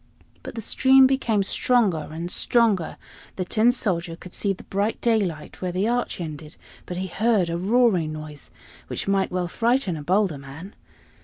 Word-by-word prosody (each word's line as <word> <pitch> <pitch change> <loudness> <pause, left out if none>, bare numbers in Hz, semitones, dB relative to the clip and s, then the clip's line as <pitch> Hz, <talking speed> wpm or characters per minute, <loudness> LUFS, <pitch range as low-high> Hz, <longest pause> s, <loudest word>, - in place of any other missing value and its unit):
But - - -9
the 225 - -4
stream 265 +4 +5
became 240 -6 +1
stronger 195 -7 +1
and 170 +3 -5
stronger. 220 -8 +1 0.4
The 185 - -3
Tin 225 +5 +3
Soldier 175 -9 -2
could 180 +1 -13
see 200 - 0
the 195 - -6
bright 200 +3 -2
daylight 200 -10 -1
where 180 -1 -2
the 185 +4 0
arch 245 -3 -1
ended; 155 -2 -7 0.3
but 180 - -5
he 185 - -2
heard 200 -2 +1
a 170 - -1
roaring 195 -5 +2
noise, 155 -2 -9 0.4
which - - -4
might 195 -1 +1
well 180 -1 -1
frighten 230 -1 0
a 155 - -6
bolder 185 -1 +1
man. 145 +9 -10
190 Hz, 170 wpm, -24 LUFS, 170-225 Hz, 0.4 s, stream